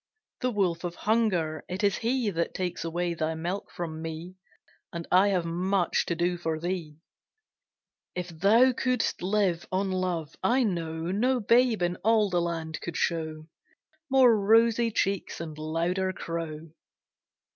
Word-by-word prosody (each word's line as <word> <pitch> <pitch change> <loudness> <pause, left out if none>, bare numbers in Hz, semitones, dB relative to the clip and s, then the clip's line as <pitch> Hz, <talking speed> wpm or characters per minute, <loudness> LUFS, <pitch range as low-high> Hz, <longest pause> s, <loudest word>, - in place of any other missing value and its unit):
The 255 - 0
wolf 185 -7 0
of 175 -1 -4
Hunger, 185 -9 0
it 185 +4 -4
is 200 -1 +3
he 235 -2 0
That 170 -2 -2
takes 180 -1 -3
away 170 +1 -1
thy 160 -1 -2
milk 175 +5 -4
from 160 -2 -5
me, 165 +2 -6 0.6
And 170 -1 -6
I 185 +3 +6
have 185 -4 +1
much 180 +2 0
to 170 - 0
do 175 +1 0
for 160 -2 -2
thee. 170 -3 -4 1.2
If 180 -1 -4
thou 205 +10 +4
couldst 250 -1 0
live 185 -2 0
on 190 +1 0
love, 180 -4 -2
I 255 +2 +3
know 165 -4 -2
No 250 +6 +2
babe 235 -2 +3
in 175 0 0
all 215 -2 +2
the 175 -1 +2
land 165 -2 -3
could 170 - -5
show 155 -2 -2 0.6
More 260 -3 +6
rosy 225 +3 +4
cheeks 200 -3 -1
and 160 -2 -6
louder 170 +5 -1
crow. 165 -2 -5
180 Hz, 150 wpm, -28 LUFS, 165-205 Hz, 1.2 s, I